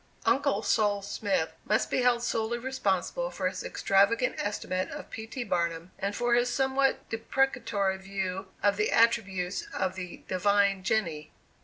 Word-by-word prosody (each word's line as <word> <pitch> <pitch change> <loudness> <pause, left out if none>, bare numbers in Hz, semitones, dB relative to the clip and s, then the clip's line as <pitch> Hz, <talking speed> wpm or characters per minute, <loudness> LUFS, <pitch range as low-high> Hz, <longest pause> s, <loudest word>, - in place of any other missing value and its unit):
"Uncle" 270 -7 +2
Sol. 205 -2 +2
Smith 195 -4 -1
must 215 - +1
be - - +2
held 245 -1 +3
solely 230 0 -1
responsible 260 - -1
for - - -2
his - - -4
extravagant 230 - +2
estimate 185 -2 -2
of - - -8
P. 220 0 -6
T. 250 +2 -4
Barnum, 170 -3 -1
and 200 +1 -2
for 240 0 +1
his 240 +1 +3
somewhat 270 +1 +1
deprecatory 225 -5 0
view 190 -1 -4 0.2
of 205 0 +3
the 210 - +1
attributes 195 -6 +2
of 190 -1 -1
the 185 -2 -8
"divine 200 +1 +2
Jenny." 170 -7 -1
205 Hz, 150 wpm, -29 LUFS, 190-240 Hz, 0.2 s, held